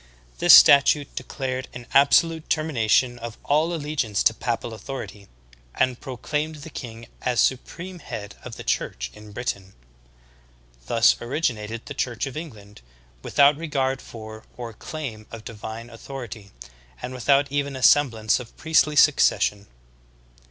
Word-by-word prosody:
This - - +9
statute 140 +1 +6
declared 130 0 -4
an 120 -1 -8
abso 140 +3 +6
lute 165 -1 -8
termination 125 -5 +1
of 115 -1 -7
all 155 +4 +2
allegiance 145 - -1
to - - +4
papal 115 0 -3
authority, 105 -4 -8 0.5
and 130 -2 0
pro 130 -3 -7
claimed 155 +4 -2
the 160 - -10
king 115 -4 -8 0.2
as 125 -2 0
supreme 175 +7 -1
head 105 -9 -7
of 120 -2 -8
the - - -9
Church - - -2
in 105 0 -13
Britain. 100 -4 -5 1.1
Thus 115 - +4
originated 115 -4 -3
the 145 - -7
Church 120 -3 -2
of 135 - -7
England, 110 - -9 0.4
without 140 - +4
regard 135 -4 -1
for 110 -1 -10
or 120 -2 -6
claim 120 -6 -7
of 115 -1 -9
divine 115 +1 -8
authority, 115 -4 -9 0.5
and 125 - -6
without 140 +2 +2
even 140 -1 -1
a 130 - -6
semblance 120 -8 +4
of 120 -2 -12
priestly 155 -1 +2
succession. 105 -8 +3
125 Hz, 140 wpm, -24 LUFS, 110-145 Hz, 1.1 s, This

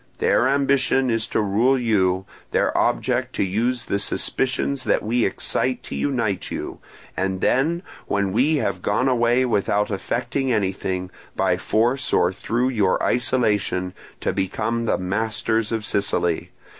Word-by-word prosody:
Their 125 - +3
ambition 135 -2 +2
is 115 0 -1
to - - 0
rule 110 +7 +2
you, 95 -6 +1 0.2
their - - +1
object - - 0
to - - +1
use 115 +6 -1
the 100 - -1
suspicions 130 +5 -1
that - - +1
we 115 +2 +1
excite 125 +5 -1
to - - -7
unite 115 -9 -1
you, - - -5 0.4
and 95 0 -1
then, 160 - +1 0.2
when 100 -1 0
we 135 +8 +3
have 100 -10 -1
gone 115 +8 +1
away 120 0 +3
without 105 -2 +1
effecting 125 +6 -1
anything, 95 -3 -1 0.2
by - - +2
force 120 +5 0
or 90 - +3
through 120 +6 -1
your 105 -7 +1
isolation, 105 -7 +1 0.3
to - - 0
become 115 +5 -1
the - - +1
masters 110 +3 -1
of 110 -2 -2
Sicily. 90 -5 0
115 Hz, 145 wpm, -22 LUFS, 100-130 Hz, 0.4 s, Their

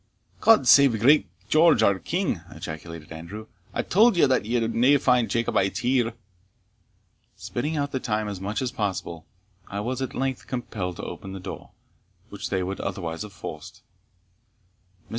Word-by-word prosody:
"God 220 - +5
save 135 -4 +6
great 140 +7 +5 0.2
George 155 -3 +5
our 100 -2 +3
King!" 170 - -2
ejaculated 80 0 -8
Andrew. 85 +7 -8 0.3
"I - - -2
tauld 220 +3 +4
ye 170 - +6
that 130 -5 +1
ye 120 +2 +1
would 120 +5 +3
find 125 -3 +3
nae - - -15
Jacobites 110 -4 0
here." 120 -2 +1 1.2
Spinning 150 +6 -3
out 145 -1 -1
the 130 - -2
time 110 -4 -1
as 100 -2 -5
much 105 +6 -2
as 125 - -2
possible, 95 - -4 0.4
I 100 - -5
was 125 +5 -3
at 130 - -4
length 135 -1 -2
compelled 105 -8 -4
to - - -8
open 95 -1 -7
the 95 - -6
door, 95 - -8 0.6
which - - -6
they 95 -1 0
would 95 +2 -4
otherwise 85 -4 -4
have 105 -1 -6
forced. 95 - -9 1.2
Mr. - - -31
115 Hz, 165 wpm, -25 LUFS, 95-130 Hz, 1.2 s, save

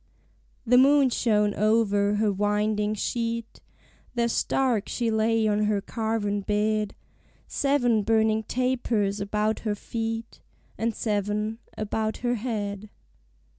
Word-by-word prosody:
The 250 +2 +5
moon 275 0 +5
shone 210 -3 +2
over 210 -1 +2
her 210 0 +2
winding 210 +1 0
sheet, 230 +1 -3 0.5
There 235 -1 +2
stark 235 -2 0
she 235 -2 -1
lay 220 0 +2
on 210 0 +1
her 210 -1 +1
carven 210 -1 -2
bed: 210 +1 0 0.5
Seven 245 -6 +2
burning 220 0 +2
tapers 240 -5 0
about 210 +2 0
her 210 -2 -2
feet, 225 +1 -5 0.3
And 225 -1 -2
seven 210 +1 -1 0.2
about 215 +1 -2
her 240 - +2
head. 210 -3 -4
220 Hz, 115 wpm, -26 LUFS, 210-230 Hz, 0.5 s, The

